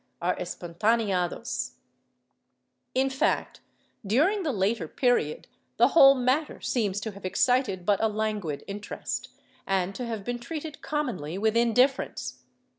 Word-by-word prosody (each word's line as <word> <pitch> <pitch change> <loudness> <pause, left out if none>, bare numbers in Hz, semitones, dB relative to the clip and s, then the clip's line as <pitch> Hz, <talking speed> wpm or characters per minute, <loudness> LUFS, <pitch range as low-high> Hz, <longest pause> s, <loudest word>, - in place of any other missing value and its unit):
are 180 +1 0
espontaneados} 200 +5 -1 1.2
In 265 +1 +3
fact, 265 - 0 0.4
during 305 - +2
the 320 -5 0
later 200 -4 0
period, 245 - 0 0.3
the - - +6
whole 275 -4 +8
matter 260 +4 0
seems 205 -5 0
to 220 - -4
have 200 0 -13
excited 200 -1 +1
ijut 205 0 +3
a 220 - +2
languid 210 -8 -2
iriterest, 205 +1 -5 0.4
and 190 -1 0
to 245 +3 -5
have 225 -3 -4
been 245 +3 -3
treated 305 +3 -6
commonly 220 - -3
with 220 +2 +1
indifference. 250 +3 +1
220 Hz, 125 wpm, -27 LUFS, 195-255 Hz, 1.2 s, whole